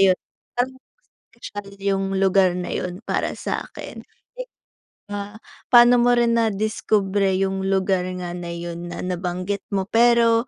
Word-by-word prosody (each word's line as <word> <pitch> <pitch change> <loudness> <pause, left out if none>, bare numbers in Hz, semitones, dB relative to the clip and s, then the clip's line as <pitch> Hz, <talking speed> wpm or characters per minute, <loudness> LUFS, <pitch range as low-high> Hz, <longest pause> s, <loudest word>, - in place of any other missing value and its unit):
ayun, 190 -2 +5 0.4
parang 255 +2 0 0.6
special 205 -3 -8
yung 195 -1 0 0.2
lugar 190 -1 +4
na 180 - -4
yun 180 +2 -4
para - - -1
sa'kin. - - -6 0.3
Eh - - -4 0.7
ba, 205 +1 -5 0.4
paano 240 0 +8
mo 245 0 +4
rin 235 -1 +3
nadiskubre 205 -2 +1
yung 190 0 -1
lugar 190 -1 +1
nga 175 -1 -5
na 175 -1 -6
yun 170 0 -6
na - - -5
nabanggit 180 +2 -3
mo? 195 - +1
Pero 235 0 +4
195 Hz, 140 wpm, -22 LUFS, 185-230 Hz, 0.7 s, paano